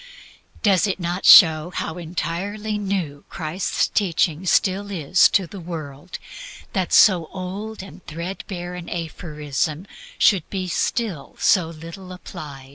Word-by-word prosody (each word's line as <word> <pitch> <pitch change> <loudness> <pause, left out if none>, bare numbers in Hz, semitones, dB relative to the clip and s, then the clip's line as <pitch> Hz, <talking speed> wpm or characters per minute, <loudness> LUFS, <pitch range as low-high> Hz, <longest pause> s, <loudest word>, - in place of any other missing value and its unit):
Does 200 -2 +4
it 195 - -2
not 175 +1 -3
show 160 -1 +8
how 180 -1 -4
entirely 195 +6 -3
new 185 -8 -3
Christ's 165 +3 -1
teaching 175 -3 0
still 195 +3 +2
is 180 -1 +3
to 190 - +2
the 195 +3 -10
world, 160 -1 -7 0.6
that 185 -2 -1
so 180 -6 +6
old 195 +3 -6
and 195 - -13
threadbare 175 +2 -6
an 180 -1 -7
aphorism 155 -1 -3 0.3
should 190 -6 +4 0.3
still 190 - -2
be - - -27
so 180 -5 +3
little 165 +3 -10
known? 180 0 -9
180 Hz, 125 wpm, -22 LUFS, 160-195 Hz, 0.6 s, show